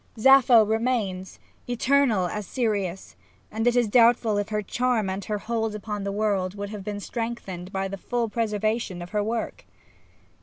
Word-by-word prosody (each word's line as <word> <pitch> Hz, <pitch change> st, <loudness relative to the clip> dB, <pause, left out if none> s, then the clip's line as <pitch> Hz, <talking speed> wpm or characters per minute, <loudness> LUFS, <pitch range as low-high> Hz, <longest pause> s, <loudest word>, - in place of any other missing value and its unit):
Sappho 250 Hz, -2 st, +6 dB
remains, 220 Hz, -4 st, -1 dB, 0.3 s
eternal 245 Hz, -4 st, +2 dB
as 205 Hz, +2 st, -4 dB
Sirius, 200 Hz, -7 st, -2 dB, 0.4 s
and 225 Hz, +2 st, -1 dB
it 245 Hz, -, +3 dB
is 245 Hz, -2 st, +3 dB
doubtful 230 Hz, -1 st, +4 dB
if 205 Hz, +1 st, -3 dB
her 210 Hz, -1 st, -1 dB
charm 235 Hz, -3 st, 0 dB
and 195 Hz, +1 st, -4 dB
her 210 Hz, -, -2 dB
hold 225 Hz, 0 st, -2 dB
upon 210 Hz, -1 st, -5 dB
the 200 Hz, -, -2 dB
world 200 Hz, -2 st, -1 dB
would 200 Hz, 0 st, -5 dB
have 210 Hz, -2 st, -7 dB
been 205 Hz, 0 st, -4 dB
strengthened 205 Hz, -6 st, -5 dB
by 195 Hz, 0 st, -2 dB
the 195 Hz, +1 st, -6 dB
full 235 Hz, +4 st, -2 dB
preservation 215 Hz, -4 st, -2 dB
of 175 Hz, -, -11 dB
her 210 Hz, -1 st, 0 dB
work. 225 Hz, +1 st, -3 dB
215 Hz, 165 wpm, -25 LUFS, 200-235 Hz, 0.4 s, Sappho